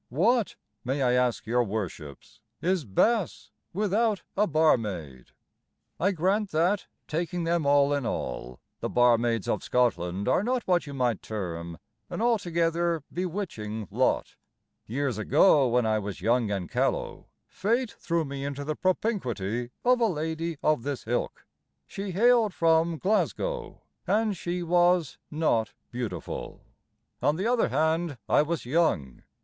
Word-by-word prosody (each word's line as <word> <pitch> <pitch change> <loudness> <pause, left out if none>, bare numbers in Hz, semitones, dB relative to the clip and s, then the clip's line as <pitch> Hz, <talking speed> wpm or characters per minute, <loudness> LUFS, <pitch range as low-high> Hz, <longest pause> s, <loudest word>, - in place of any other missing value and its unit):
What, 215 - +2 0.3
may 135 +2 -1
I 125 -1 +3
ask 125 -1 +1
your 120 +2 +2
Worships, 95 -9 -6 0.2
Is 180 -3 0
Bass 205 - +1 0.2
without 210 +2 +1
a 210 +2 +3
barmaid? 105 - 0 0.7
I 190 +5 +2
grant 195 +4 +1
that, 175 +5 +1 0.2
taking 170 +2 -2
them 165 -3 0
all 145 0 +4
in 145 -1 0
all, 60 - -4 0.2
The - - -3
barmaids 120 -3 +3
of - - 0
Scotland 100 -6 0
Are 185 - +3
not 250 +1 0
what 175 -4 +1
you 140 - -7
might 125 -5 0
term 85 -5 -5 0.3
An - - -5
altogether 170 - +1
bewitching 155 - -4
lot. - - 0 0.5
Years 130 -1 -2
ago, 140 - +5
when 120 0 +2
I 110 -1 +2
was 105 -1 -5
young 115 -1 +2
and 95 -4 -2
callow, - - -1 0.2
Fate 235 +4 -1
threw 170 -2 -2
me 140 -1 -5
into 140 0 -4
the 155 +1 -2
propinquity 125 - -1 0.2
Of 250 0 +4
a 230 - +5
lady 160 -2 -3
of 155 -5 +3
this 140 +1 -4
ilk; 120 +2 -2 0.4
She 200 0 -6
hailed 225 +1 +3
from 165 0 +3
Glasgow, 465 - -1 0.2
And 215 -1 +2
she 175 +1 -3
was 175 -2 +2
not 150 -8 0 0.2
beautiful; 115 - -5 0.6
On 150 - +2
the 190 +5 -2
other 235 - +2
hand, 160 +2 0
I - - +4
was 155 -1 -2
young. 125 - 0
155 Hz, 140 wpm, -27 LUFS, 120-185 Hz, 0.7 s, ago